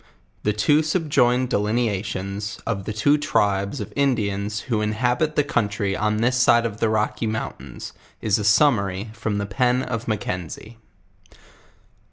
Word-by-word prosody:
Ths. 105 0 0
two 150 +1 +5
subjoined 140 -6 +2
delineations, 105 -2 -1
of 100 -4 -2
the - - -3
two 145 +8 +2
Tribes 100 -5 0
of 105 - -6
Indians 105 -6 0
who 115 -5 -1
inhabit 125 +8 0
the 150 - +3
country 105 -7 -1
on 105 0 0
this 125 +3 +1
side 120 -1 +4
of 110 -1 -4
the 115 - +2
Rocky 105 +1 0
mountains, 110 0 -5 0.3
is 110 0 +1
a - - -2
summary, 105 -3 +2
from 110 -2 -3
the 100 - -1
pen 125 +5 +1
of 115 -2 -4
Mackenzie. 105 +1 -4
110 Hz, 145 wpm, -23 LUFS, 100-125 Hz, 0.3 s, two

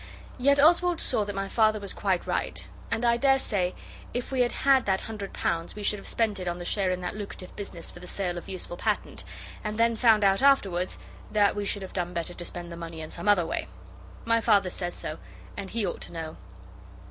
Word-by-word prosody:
Yet 280 +2 +4
Oswald 345 +3 +5
saw 215 - +3
that 205 -1 -5
my 195 0 -2
Father 215 0 +3
was 200 -1 0
quite 190 -3 0
right; - - -1 0.2
and 235 - 0
I 235 0 +4
daresay 240 -9 +2 0.4
if 245 +2 -2
we 260 -1 +2
had 240 - +3
had 270 -4 +3
that 190 -1 +2
hundred 210 -3 -6
pounds 165 0 -2
we 210 - -6
should 210 0 +1
have - - -7
spent 220 -3 +1
it 180 - -4
on 175 0 -1
the 175 - -6
share 195 0 +1
in 185 0 -1
that 180 +2 -3
lucrative 200 -3 -7
business 195 -5 -7
for - - -12
the 180 - -10
sale 180 -1 -2
of 175 - -7
useful 180 -2 -5
patent, - - -1 0.4
and 215 0 -3
then 230 0 +3
found 220 -2 +5
out 195 +2 +4
afterwards 195 -10 +3 0.3
that 205 -1 +4
we 205 0 -2
should 200 0 -1
have 190 - -8
done 175 -1 -2
better 170 +1 -2
to 175 - -6
spend 175 -1 -5
the 170 - -7
money 165 -1 -7
in 155 - -7
some 170 +3 -6
other 200 -5 +5
way. - - -2 0.6
My 230 0 +3
Father 200 -5 +4
says 175 -1 -4
so, 155 - -6 0.4
and 200 -1 -5
he 225 -2 -1
ought 180 - -3
to - - -7
know. 160 -1 -5
200 Hz, 230 wpm, -28 LUFS, 175-225 Hz, 0.6 s, Oswald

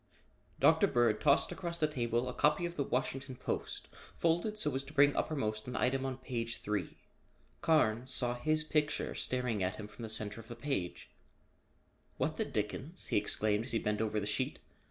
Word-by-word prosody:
Dr. - - +6
Bird 120 -3 +2
tossed 145 +2 +4
across 170 -1 -4
the 155 - +4
table 120 -4 0
a 125 - -3
copy 150 +6 +3
of 170 0 -4
the 145 - -1
Washington 130 0 -2
Post - - -4 0.3
folded 175 +6 +1
so 150 -9 0
as 135 +1 -1
to 140 - -11
bring 145 -1 +5
uppermost 110 -8 -1
an 125 - -4
item 135 +1 +1
on 130 -1 -3
page 120 -3 -3
three. 105 -1 -3 0.6
Carnes 130 -6 +3
saw 120 -2 +2
his 155 +5 +1
picture 150 -1 0
staring 125 -5 -1
at 95 +2 0
him 105 - -7
from 105 - -13
the 115 - -4
center 110 0 -3
of 115 - -17
the 120 - -7
page. 120 -9 -3 1.1
"What - - 0
the - - +1
dickens?" 130 - -3
he - - +2
exclaimed 105 +1 +1
as 130 - -4
he - - +3
bent 105 -1 0
over 110 -1 0
the 100 - -3
sheet. 130 +7 -1
125 Hz, 190 wpm, -34 LUFS, 110-150 Hz, 1.1 s, Dr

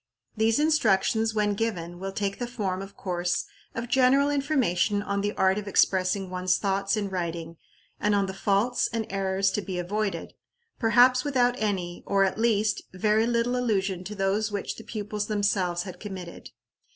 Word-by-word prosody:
These 220 +1 +2
instructions, 225 -7 +2
when 210 -1 +2
given, 175 -6 -3
will 195 +1 -4
take 200 0 -3
the 245 - -2
form, 200 -6 -3
of 195 0 -10
course, 175 -1 -1 0.3
of 230 +1 -3
general 265 +3 +4
information 235 - +1
on 200 -1 -1
the 205 +1 0
art 190 +2 +2
of 205 - -8
expressing 190 0 +2
one's 185 0 +1
thoughts 195 +1 0
in 205 -1 -1
writing, 170 -3 -4 0.4
and 210 0 +2
on 200 -1 +2
the 190 - -5
faults 200 +5 +1
and 230 -1 -2
errors 195 0 +1
to 210 - -1
be 190 -2 -5
avoided, 195 0 -2 0.5
perhaps 250 +2 +5
without 250 -4 +2
any, 185 -5 -2
or, 195 -1 +3
at 195 +2 0
least, 215 -2 +2
very 215 +4 +2
little 240 +1 +1
allusion 195 -7 0
to 210 - -6
those 200 +2 0
which 200 -1 -3
the 225 - -9
pupils 210 -1 -4
themselves 195 -4 0
had 185 -3 -9
committed. 185 -4 -8
205 Hz, 170 wpm, -26 LUFS, 190-225 Hz, 0.5 s, perhaps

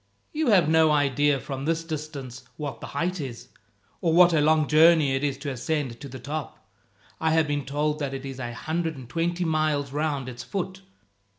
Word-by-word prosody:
"You 310 0 0
have 190 -9 +5
no 160 0 +5
idea 145 -1 +2
from 135 0 -5
this 165 +1 0
distance 145 -6 -6
what 145 -3 -5
the - - -6
height 170 +4 -2
is, 125 -4 -7 0.5
or 165 - +2
what 175 0 +7
a 155 - +3
long 155 0 +3
journey 155 -2 +5
it 135 +1 -1
is 140 -2 0
to 140 0 -4
ascend 130 -2 -2
to 140 - -7
the 130 - -8
top. 145 +4 -6 0.5
I 160 - +1
have 160 -1 +3
been 145 -1 -2
told 150 +2 -1
that 140 -2 -3
it 135 0 -6
is 135 -1 -7
a 120 -2 -4
hundred 160 +6 -2
and 130 -3 -10
twenty 170 +5 -1
miles 155 -3 0
round 145 -2 -1
its 120 -1 -7
foot." 190 -1 -4
150 Hz, 200 wpm, -26 LUFS, 135-160 Hz, 0.5 s, what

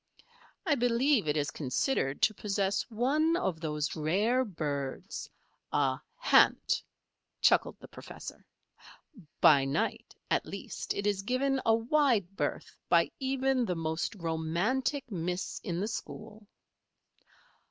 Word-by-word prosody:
"I 320 - +3
believe 245 - +2
it 150 +1 +1
is 145 -1 0
considered 135 - -1
to 215 - +5
possess 200 0 -1
one 285 +9 +2
of 180 - -2
those 150 -1 -2
rare 200 +11 +2
birds, 150 - -4 0.4
a - - +1 0.2
'hant,'" - - +4 0.6
chuckled - - +3
the - - -12
professor. - - -10 1.0
"By 140 -3 +7
night, 135 +3 -2 0.2
at - - +1
least, - - -5
it 200 - -3
is 205 -2 +1
given 260 +5 0
a 225 - +6
wide 230 - +2
berth - - -3
by - - +4
even 265 -1 +1
the 180 -6 -1
most 160 +4 -2
romantic 190 - -1
miss 180 0 -3
in 175 -2 -3
the 205 - -1
school." 215 -1 -7
205 Hz, 120 wpm, -30 LUFS, 160-255 Hz, 1.0 s, By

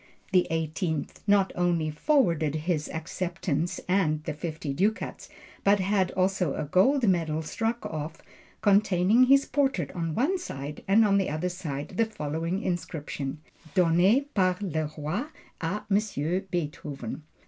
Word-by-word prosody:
Louis 180 -1 +4
XVIII, 160 -1 -1 0.2
not 200 -1 +4
only 170 -3 +1
forwarded 165 - +2
his 155 -1 -1
acceptance 170 0 -2
(and 160 -5 +1
the 155 - -3
fifty 155 -2 -4
ducats), 205 +9 -1 0.3
but 200 +1 +4
had 190 -1 +2
also 185 -5 +1
a - - -2
gold 235 - +3
medal 160 -4 +1
struck 225 +8 -2
off, 155 +1 -5 0.4
containing 205 +2 +4
his 275 +2 +5
portrait 275 0 0
on 165 -3 -3
one 355 +10 +1
side, 145 - -6
and 215 +3 +5
on 200 -1 +4
the 195 - 0
other, 155 +4 -1
the 175 +5 -3
following 165 +4 -2
inscription: 150 -5 -4 0.3
"Donné 185 +9 +4
par 185 -2 +2
le 160 -6 -2
Roi 165 - -2 0.3
à 185 +5 -2
monsieur 195 -5 0
Beethoven." 150 -6 -4
175 Hz, 135 wpm, -27 LUFS, 155-200 Hz, 0.4 s, his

